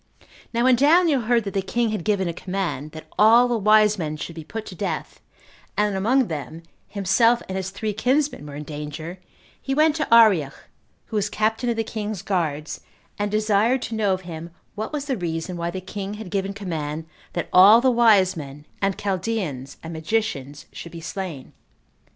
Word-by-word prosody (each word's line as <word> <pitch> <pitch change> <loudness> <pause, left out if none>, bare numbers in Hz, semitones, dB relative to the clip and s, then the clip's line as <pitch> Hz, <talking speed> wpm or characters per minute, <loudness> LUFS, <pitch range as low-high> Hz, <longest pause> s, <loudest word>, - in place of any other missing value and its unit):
Now 235 0 0
when 255 -1 +5
Daniel 300 +1 +4
heard 235 0 +2
that 200 - -5
the 195 - +1
king 235 +4 0
had 210 -5 -3
given 200 -2 +1
a 170 - -2
command, 180 -5 -3
that 155 0 -9
all 230 +4 +7
the 240 - 0
wise 215 -1 +4
men 155 -2 -3
should 165 - -6
be 160 -1 -8
put 220 +8 -6
to - - -9
death, - - -4 0.6
and 210 0 +2
that - - -2
among 255 +6 +3
them 155 +1 -6 0.2
himself 230 +5 +2
and 190 - -5
his 190 0 -3
three 210 +2 -3
kinsmen 255 - 0
were 145 - -8
in 150 - -6
danger, 150 +4 -7 0.4
he 270 - -2
went 305 +1 +4
to 305 - -2
Arioch, 200 -12 +5 0.5
who 220 - -4
was 205 0 0
captain 220 +3 0
of 235 - 0
the 225 - 0
king's 210 -3 -5
guards, 160 -6 -2 0.4
and 205 0 0
desired 215 +4 +2
to - - -5
know 210 -3 +1
of 185 0 -1
him 170 -2 -8 0.2
what 215 +1 -5
was 295 -2 -3
the 270 -4 -1
reason 170 0 -3
why 170 0 -2
the 185 +2 -4
king 200 +2 -6
had 210 -3 -8
given 195 -1 -1
command 160 -6 -4 0.3
that 175 - -2
all 200 +5 +9
the 255 +1 +3
wise 215 -6 +4
men, 145 -1 -8 0.2
and 195 -1 0
Chaldeans, 185 - -3
and 165 +1 -6
magicians 160 -5 -2
should 170 - -9
be 170 - -7
slain. 165 -5 -6
200 Hz, 195 wpm, -23 LUFS, 165-225 Hz, 0.6 s, all